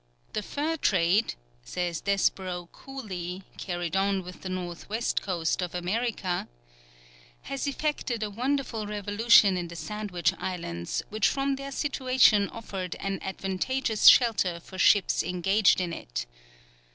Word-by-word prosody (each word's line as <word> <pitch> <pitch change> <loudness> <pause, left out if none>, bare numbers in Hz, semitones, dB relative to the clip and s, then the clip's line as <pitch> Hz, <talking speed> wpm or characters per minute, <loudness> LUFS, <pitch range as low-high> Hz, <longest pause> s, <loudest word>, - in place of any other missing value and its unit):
"The - - -1
fur 305 +8 -2
trade," 190 - +2 0.3
says 170 - -3
Desborough 185 -3 0
Cooley, 190 -9 -7 0.2
carried 175 -2 -3
on 195 0 +1
with 180 0 -10
the 185 - -5
north 180 -1 -5
west 225 +3 0
coast 175 -2 -1
of 180 -1 -4
America, 190 0 -1 1.0
"has 275 +1 -3
effected 280 -5 -2
a 210 - -2
wonderful 245 -1 -1
revolution 205 -1 +4
in 175 -1 -3
the 170 - -9
Sandwich 190 -2 -1
Islands, 85 - -3
which 215 -1 +2
from 275 0 0
their 275 0 -7
situation 255 -7 +3
offered 195 -5 -5
an 195 -1 -3
advantageous 200 +5 0
shelter 195 -8 +6
for 185 +2 -11
ships 205 0 +4
engaged 190 +4 +3
in 175 -2 -2
it. - - -5
195 Hz, 130 wpm, -28 LUFS, 180-230 Hz, 1.0 s, shelter